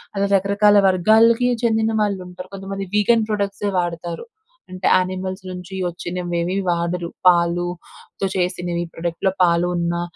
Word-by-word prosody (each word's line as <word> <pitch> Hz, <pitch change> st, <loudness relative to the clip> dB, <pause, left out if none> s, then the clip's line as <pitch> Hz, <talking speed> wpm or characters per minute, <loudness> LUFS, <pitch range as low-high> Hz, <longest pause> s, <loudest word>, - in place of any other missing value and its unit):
అలా 200 Hz, 0 st, +1 dB
రకరకాల 200 Hz, +2 st, +3 dB
వర్గాలకి 225 Hz, +6 st, +4 dB
చెందిన 220 Hz, -1 st, +2 dB
వాళ్ళుంటరు. 185 Hz, -3 st, -5 dB
కొంతమంది 195 Hz, 0 st, -6 dB
వీగన్ 220 Hz, +2 st, +3 dB
ప్రొడక్ట్సే 200 Hz, 0 st, -2 dB
వాడతారు. 170 Hz, -, -4 dB, 0.4 s
అంటే, 185 Hz, 0 st, -2 dB
యానిమల్స్ 185 Hz, +1 st, -2 dB
నుంచి 180 Hz, +1 st, -8 dB
ఒచ్చినవేవీ 175 Hz, 0 st, -3 dB
వాడరు. 170 Hz, 0 st, -1 dB, 0.2 s
పాలుతో 175 Hz, +2 st, 0 dB
చేసినివి, 175 Hz, -1 st, -1 dB
ప్రొడక్ట్‌లో 170 Hz, +3 st, -2 dB
పాలు 170 Hz, 0 st, +3 dB
ఉన్నా, 170 Hz, 0 st, -1 dB
180 Hz, 110 wpm, -21 LUFS, 175-200 Hz, 0.4 s, వర్గాలకి